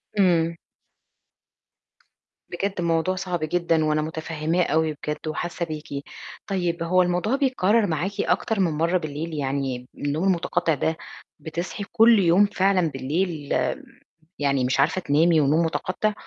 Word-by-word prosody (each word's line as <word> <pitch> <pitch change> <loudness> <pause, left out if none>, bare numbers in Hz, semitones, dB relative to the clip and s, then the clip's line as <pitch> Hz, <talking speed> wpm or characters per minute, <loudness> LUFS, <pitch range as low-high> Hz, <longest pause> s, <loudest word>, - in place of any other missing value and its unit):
امم. 170 -4 +3 1.9
بجد 195 +1 -3
موضوع 170 +2 +1
صعب 185 -2 -3
جدًاً، 165 0 +1
وأنا 155 0 +1
مُتفهماه 160 +2 -1
أوي 160 0 +1
بجد 150 +2 -6
وحاسة 170 +2 -3
بيكِ، 150 -3 -6 0.4
طيب 175 -3 -1
هو 185 +2 +3
الموضوع 180 +7 +1
بيتكرر 230 -6 +2
معاكِ 170 +4 -1
أكتر 220 -3 0
من 180 -4 +2
مَرّة 165 +4 +1
بالليل؟ 155 0 -5
يعني 135 -3 -2
النوم 145 +4 -2
المُتقطع 175 -3 +1
ده 160 +3 -1 0.4
بتصحي 170 +6 -5
كُلّ 225 0 +6
يوم 185 +2 +5
فعلًاً 195 -3 +2
بالليل 150 +3 -2 0.9
يعني 140 -3 +1
مش 130 +2 0
عارفة 160 +6 +2
تنامي 160 +2 +3
ونوم 155 +4 +3
مُتقطع؟ 185 +5 -1
165 Hz, 130 wpm, -24 LUFS, 155-185 Hz, 1.9 s, كُلّ